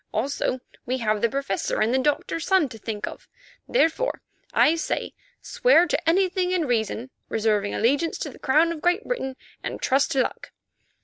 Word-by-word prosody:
Also, 255 +2 -1 0.2
we 255 +1 -1
have 215 -3 0
the 235 - +3
Professor 270 -7 -2
and 220 +3 +2
the 265 - +3
Doctor's 295 +4 -1
son 380 -6 +4
to 225 -3 -10
think 210 -1 -4
of. - - -9 0.4
Therefore 485 +2 +1 0.3
I 310 - +5
say: 330 -2 -2 0.3
Swear - - +4
to 330 - 0
anything 365 +1 +2
in 360 -3 +1
reason, 235 0 -1 0.2
reserving 210 -2 0
allegiance 285 +9 +1
to - - -5
the - - -15
Crown 310 +5 +3
of 320 -2 -6
Great 355 +5 +2
Britain, 265 - -3 0.3
and - - -4
trust 270 +1 +2
to 270 - +3
luck. - - -6
275 Hz, 175 wpm, -24 LUFS, 230-335 Hz, 0.4 s, I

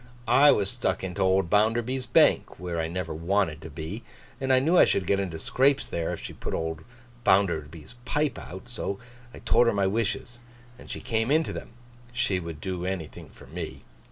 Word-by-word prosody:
'I 135 +5 +7
was 100 -1 +1
stuck 95 -8 -1
into 95 +1 -3
old 95 -1 +3
Bounderby's 120 +5 +2
bank - - +3
(where 85 -2 -2
I 80 - -1
never 85 -1 -4
wanted 85 -1 0
to 80 - -8
be), 80 +8 -6 0.4
and 135 -1 0
I 130 - +6
knew 155 +7 +3
I - - +8
should 95 - +1
get 100 +2 +2
into 90 -4 -3
scrapes 135 - +2
there, 85 -1 -2
if - - -4
she - - -7
put - - -4
old 80 -1 -3 0.4
Bounderby's 85 -3 +1
pipe 150 +2 -1
out; 95 +6 -9
so 110 -5 -4 0.3
I - - -12
told 120 - +3
her 115 - +3
my 100 -1 +1
wishes, 115 +4 -2 0.4
and - - -13
she - - -5
came 115 +1 0
into 155 +2 +2
them. - - -8 0.4
She 120 -6 0
would 85 -3 -7
do 90 0 -4
anything 90 -4 -5
for - - -15
me. 80 +5 -7
95 Hz, 195 wpm, -27 LUFS, 85-120 Hz, 0.4 s, I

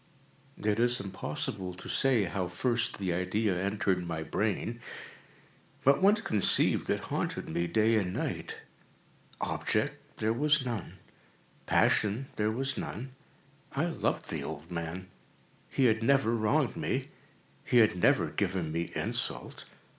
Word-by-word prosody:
It 105 +1 0
is 120 +1 +3
impossible 95 -1 -4
to 90 - -8
say 130 -6 +3
how 95 0 -2
first 120 +7 0
the 95 -3 -1
idea 95 +3 0
entered 95 -1 0
my 80 -2 -3
brain; 110 +6 -2 1.0
but 140 +4 +4
once 205 +2 +5
conceived, 105 -2 +4
it - - +1
haunted - - -2
me 85 +2 -1
day 110 +5 +3
and 95 -4 0
night. - - -3 0.9
Object - - 0 0.2
there 110 +1 +1
was 150 +2 +3
none. 115 -7 -4 0.7
Passion 110 +6 +2
there 105 0 +1
was 135 +5 -1
none. 130 +4 -5 0.6
I - - +1
loved - - -2
the - - -3
old 80 +2 -7
man. 85 +2 -4 0.6
He 135 - +2
had 110 -1 +3
never 135 -1 +3
wronged 110 -2 +1
me. - - -2 0.5
He 125 - +2
had 110 -5 +5
never 90 - +3
given 90 -5 -1
me 85 +1 -2
insult. - - -3
105 Hz, 135 wpm, -30 LUFS, 90-120 Hz, 1.0 s, once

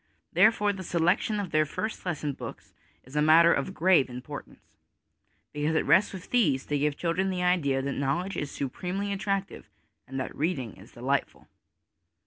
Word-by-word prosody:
Therefore, 210 -2 +4
the 190 - -7
selection 175 +5 +1
of 195 -4 -4
their 155 0 +4
first 215 +6 -5
lesson 150 -4 -2
books - - -9 0.3
is 130 +3 -14
a 150 - +3
matter 165 +2 +6
of 190 - -2
grave 170 -6 +4
importance, 125 +4 -9 0.9
because 150 +2 -1
it - - +1
rests 205 - +4
with 190 -1 -10
these 150 - +2
to 145 -1 -1
give 145 0 0
children 180 +3 0
the 180 -1 -2
idea 145 -7 +2
that 140 - -2
knowledge 170 +9 -1
is 145 - -3
supremely 185 +10 -3
attractive 195 0 -3 0.4
and 135 +1 -5
that 130 - -4
reading 140 - -2
is 100 +4 -16
delightful. 135 +4 -2
165 Hz, 165 wpm, -28 LUFS, 140-190 Hz, 0.9 s, matter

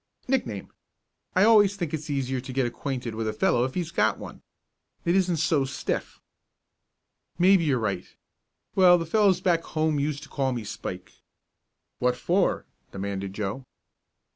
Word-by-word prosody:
"Nickname. 120 - -2 0.6
I 185 - +5
always 205 -2 +6
think 170 -6 -4
it's 155 -1 -4
easier 135 -2 -1
to 130 - -8
get 130 0 +1
acquainted 125 -1 -4
with 110 0 -3
a 110 - -1
fellow 120 +3 +2
if 130 - -5
he's 170 -2 -2
got - - +2
one. - - -10 0.6
It 170 +1 +2
isn't 180 -3 +2
so 155 -2 +2
stiff." 135 - -4 1.2
"Maybe 185 -1 +5
you're 140 -4 +2
right. 100 -6 -2 0.7
Well, 180 -2 +6
the 165 - -3
fellows 190 0 +3
back 175 -4 +2
home 155 -2 0
used 145 0 -2
to 145 - -12
call 135 -2 -1
me 120 -2 -4
'Spike'." 105 - -7 0.9
"What 125 0 +1
for?" 180 +6 +1 0.3
demanded 100 0 -4
Joe. 105 +5 -4
145 Hz, 155 wpm, -26 LUFS, 125-175 Hz, 1.2 s, always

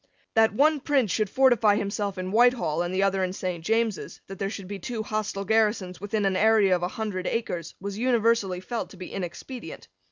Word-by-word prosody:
That 225 0 +4
one 300 +4 +4
prince 265 -7 +1
should 215 -3 0
fortify 235 -4 +4
himself 200 -1 -2
in 185 0 -4
Whitehall 230 -8 +3
and 175 0 -2
the 190 +1 +1
other 195 -1 +1
in 185 0 -2
Saint 180 -3 -4
James's, 225 +1 -1
that 195 -1 -10
there 195 - -1
should 200 -3 -7
be 200 0 -6
two 220 +4 -4
hostile 215 -2 -3
garrisons 210 -4 +1
within 205 0 -1
an 195 -1 +1
area 210 -2 +4
of 175 - -3
a 175 - 0
hundred 190 -2 -4
acres, 175 -8 -3
was 200 +2 -5
universally 230 -6 +1
felt 235 +5 -4
to 195 - -14
be 185 - -8
inexpedient. 195 +3 -7
205 Hz, 200 wpm, -26 LUFS, 185-225 Hz, -, That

